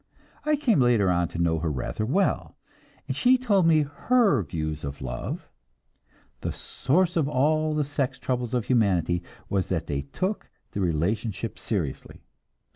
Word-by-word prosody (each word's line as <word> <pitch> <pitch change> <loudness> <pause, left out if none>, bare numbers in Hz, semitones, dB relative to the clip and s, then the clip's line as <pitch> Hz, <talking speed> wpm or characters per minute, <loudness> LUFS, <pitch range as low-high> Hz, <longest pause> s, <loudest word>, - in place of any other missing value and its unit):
I 305 - +4
came 255 - +2
later 115 -6 +4
on 85 -1 +2
to 85 - -8
know 85 -1 +1
her 80 0 -1
rather 75 - -3
well, 190 +10 0 0.5
and - - -2
she 255 +1 +5
told 205 -8 +3
me 155 -2 +5
her 195 - +2
views 80 -3 -4
of 70 -1 -5
love; - - -5 0.9
the - - -3
source 175 +7 0
of 155 -4 +2
all 155 +3 +2
the 150 -1 +1
sex 140 -2 -2
troubles 125 -1 -2
of 120 - 0
humanity 90 -8 +2 0.3
was 95 -2 -1
that 85 -4 -1
they 70 -1 -2
took 185 - -3 0.2
the 100 - -3
relationship 95 +6 -1
seriously. 85 - -4
120 Hz, 155 wpm, -26 LUFS, -, 0.9 s, she